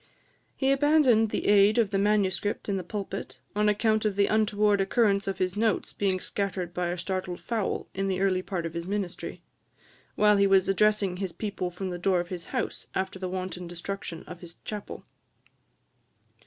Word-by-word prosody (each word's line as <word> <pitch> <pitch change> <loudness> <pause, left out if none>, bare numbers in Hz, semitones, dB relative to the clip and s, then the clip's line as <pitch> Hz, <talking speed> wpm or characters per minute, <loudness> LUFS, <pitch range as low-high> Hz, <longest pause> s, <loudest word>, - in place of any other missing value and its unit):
He 270 -1 +2
abandoned 275 -6 +4
the - - -2
aid 205 +1 +5
of 220 -4 +3
the 195 - +1
manuscript 205 -1 +1
in 200 - 0
the 185 - -2
pulpit, 195 +1 -5 0.2
on 210 0 +3
account 215 +1 +2
of 210 -2 0
the 200 0 +4
untoward 210 -1 +2
occurrence 200 0 +2
of 195 - -2
his 185 0 -1
notes 220 0 0
being 190 -2 0
scattered 185 -3 -3
by 180 0 -1
a 175 +1 -2
startled 185 0 -3
fowl, 225 -4 -2
in 195 +1 -1
the 185 -1 -1
early 190 -1 +2
part 185 -3 -4
of 165 - -4
his 170 +1 -5
ministry, 190 -3 -4 0.7
while 210 -1 +5
he 200 0 +4
was 195 -1 +4
addressing 200 -1 +2
his 190 -1 -3
people 200 -4 -3
from 185 +1 -5
the 175 - -5
door 185 0 +2
of 175 0 -4
his 175 -2 -5
house, - - -3
after 190 0 -2
the 185 -1 -3
wanton 185 -1 -4
destruction 175 -1 -6
of 180 - -10
his 170 -1 -10
chapel. 210 -2 -6
195 Hz, 185 wpm, -27 LUFS, 185-210 Hz, 0.7 s, aid